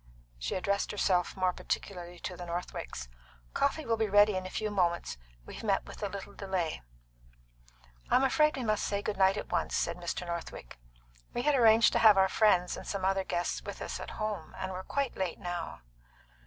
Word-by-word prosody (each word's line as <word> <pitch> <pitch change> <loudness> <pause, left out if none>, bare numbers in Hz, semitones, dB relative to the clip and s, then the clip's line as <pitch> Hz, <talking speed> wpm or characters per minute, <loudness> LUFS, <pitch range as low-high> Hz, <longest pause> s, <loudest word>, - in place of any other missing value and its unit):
She - - -2
addressed 200 +2 0
herself 185 -3 +1
more 185 -1 +2
particularly 175 -2 -4
to 180 - -4
the 175 0 -8
Northwicks. 115 - -5 0.5
"Coffee 300 +2 +1
will 230 -1 +1
be 220 -1 0
ready 205 0 +6
in 185 0 -2
a - - -7
few 215 +2 -2
moments. 170 - 0 0.3
We've - - -9
met 200 -3 +1
with - - -11
a 205 - -1
little 200 +1 -7
delay." 190 -6 -2 1.3
"I'm 260 - +4
afraid 305 +3 +3
we 260 - -2
must 215 -2 +1
say 200 0 -1
good 210 - -2
night 190 +1 +4
at - - -5
once," - - 0
said 170 - 0
Mr. 175 0 -4
Northwick. 170 - -6 0.6
"We 240 - 0
had 295 - +3
arranged 225 -4 +6
to - - +3
have 215 -3 +7
our 190 0 +5
friends 180 -5 +3
and - - -9
some 195 -2 -2
other 195 0 +2
guests 175 -1 -2
with - - -7
us - - -4
at - - -6
home. 210 -7 -4
And 190 - -3
we're 185 0 -4
quite 275 +6 -2
late 185 -3 -2
now." 175 - -5
195 Hz, 195 wpm, -31 LUFS, 175-215 Hz, 1.3 s, have